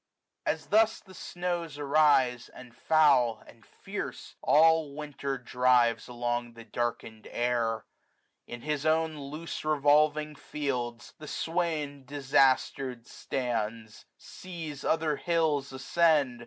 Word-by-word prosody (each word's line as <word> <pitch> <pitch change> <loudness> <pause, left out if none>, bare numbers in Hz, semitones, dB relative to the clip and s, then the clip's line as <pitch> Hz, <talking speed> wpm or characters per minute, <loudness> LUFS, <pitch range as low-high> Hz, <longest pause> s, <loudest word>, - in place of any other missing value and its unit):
ajg - - +5
As - - -6
thus 220 +1 +3
the 190 - -17
snows 175 -4 -4
arise; 140 -4 +3
and 125 -2 -14
foul, 135 -8 +3
and 115 - -17
fierce. 100 - -7
All 160 -2 +4
Winter 145 -2 -4
drives 125 -1 +2
along 120 -1 -3
the 115 0 -11
darkened 115 -1 -4
air 120 -2 -1 0.6
j - - -9
In 120 - -12
his 150 0 -2
own 160 0 +1
loose 150 +4 -6
ievolving 150 0 +2
fields, 125 -6 -4
the 155 - -9
swain 155 -5 -2
Disaster'd 135 -2 +1
stands; 115 -5 -4
sees 160 -6 -8
other 155 -2 +1
hills 160 -5 0
ascend. 140 -2 +2
140 Hz, 115 wpm, -29 LUFS, 120-155 Hz, 0.6 s, ajg